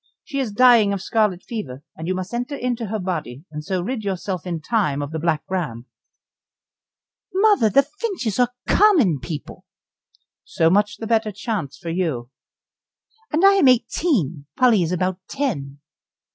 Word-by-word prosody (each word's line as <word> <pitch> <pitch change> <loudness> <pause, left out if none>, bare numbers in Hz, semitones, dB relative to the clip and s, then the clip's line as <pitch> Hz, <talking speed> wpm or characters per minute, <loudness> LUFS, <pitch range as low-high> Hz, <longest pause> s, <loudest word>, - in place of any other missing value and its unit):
She 275 - -4
is 255 -5 -1
dying 230 -2 +5
of 195 - -3
scarlet 210 -5 +1
fever, 145 - -6
and 160 - -7
you 185 - 0
must 185 +3 -5
enter 245 +4 -3
into 245 -3 -2
her 215 +2 -2
body, 160 - -4
and 150 0 -6
so 185 +2 -2
rid 235 +2 -3
yourself 190 -2 -3
in 170 -2 -2
time 155 -5 0
of 145 0 -4
the 160 - -3
Black 160 -1 0
Ram." 150 -11 -3 1.5
"Mother! 395 - +4
the 275 +7 +5
Finches 300 - -4
are 245 -1 +4 0.2
common 300 - +4
people." 155 +2 -7 0.8
"So 165 0 +1
much 205 +2 +2
the 225 - -6
better 220 -1 +1
chance 195 - -4
for 165 +2 -6
you." 155 -9 -2 1.0
"And 330 +5 +3
I 395 - +8
am 305 - +5
eighteen, 230 - +1
Polly 245 -6 +4
is 170 0 -1
about 185 +1 -1
ten." 150 - -3
200 Hz, 160 wpm, -22 LUFS, 165-245 Hz, 1.5 s, I